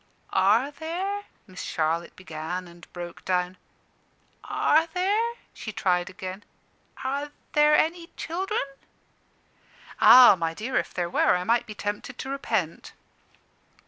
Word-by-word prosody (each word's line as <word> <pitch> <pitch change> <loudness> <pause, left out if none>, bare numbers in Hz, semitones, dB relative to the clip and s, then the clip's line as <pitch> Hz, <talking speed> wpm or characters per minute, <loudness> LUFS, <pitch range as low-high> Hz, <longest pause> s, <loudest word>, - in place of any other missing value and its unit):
"Are 215 +9 +3
there 370 +7 -4
" - - -38
Miss 185 -1 -9
Charlotte 165 +2 -1
began, 175 +1 -5
and 170 -1 -16
broke 175 -1 -8
down. 180 0 0 0.9
"Are 320 +2 +2
there," 405 +7 0 0.2
she 215 - -7
tried 180 -3 0
again, 185 +1 -7 0.6
"are 280 +3 -2 0.2
there 300 0 +5
any 335 +2 +1
children?" 380 +6 -2 1.4
"Ah, 250 -4 +9
my 165 -2 -2
dear, 245 +7 -2
if - - -1
there 175 -1 -2
were, 170 - +3
I 180 - -1
might 230 +5 +1
be 215 - -8
tempted 205 +5 -4
to 265 - -6
repent." 220 - -2
215 Hz, 130 wpm, -26 LUFS, -, 1.4 s, Ah